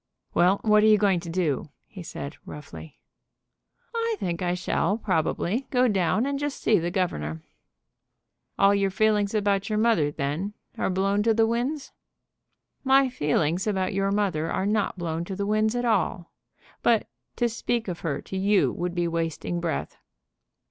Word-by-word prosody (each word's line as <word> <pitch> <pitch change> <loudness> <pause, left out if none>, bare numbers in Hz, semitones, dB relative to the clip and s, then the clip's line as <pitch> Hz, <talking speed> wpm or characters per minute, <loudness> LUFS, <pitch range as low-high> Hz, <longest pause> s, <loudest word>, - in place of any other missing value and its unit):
"Well, 185 +3 +4
what 210 -1 +5
are 215 - +5
you 215 -1 +6
going 195 -3 +2
to 170 0 -8
do?" 165 -5 -1 0.2
he 195 - -11
said, 150 -3 -7
roughly. 150 +1 -10 1.0
"I 460 -1 0
think 170 -1 -3
I 175 0 0
shall, 195 +3 0
probably, 190 - -1
go 250 -1 +3
down 195 +1 +1
and 280 0 -2
just 290 -1 -3
see 215 -4 +3
the 170 +1 -2
governor." 80 - -2 1.1
"All 195 0 +5
your 200 -1 +2
feelings 210 +1 +1
about 200 -1 +1
your 215 - 0
mother, 215 -10 +3
then, 150 +9 -3 0.2
are - - -1
blown 195 +2 +1
to 225 +1 +2
the 225 0 +4
winds?" 250 +6 -2 0.9
"My 270 0 +4
feelings 165 - 0
about 190 -1 0
your 195 0 +1
mother 195 -6 0
are 190 - -1
not 210 -1 0
blown 165 -1 -3
to 190 - -5
the 200 +1 -2
winds 215 +2 +1
at 245 0 -1
all; 190 -6 0 0.5
but 230 -2 +3 0.3
to 240 - +1
speak 235 0 -2
of 175 -2 -4
her 155 -4 -3
to - - -7
you 195 +1 +3
would 175 0 -3
be 175 -1 +1
wasting 165 +1 -2
breath." 170 -2 -3
195 Hz, 170 wpm, -26 LUFS, 175-220 Hz, 1.1 s, you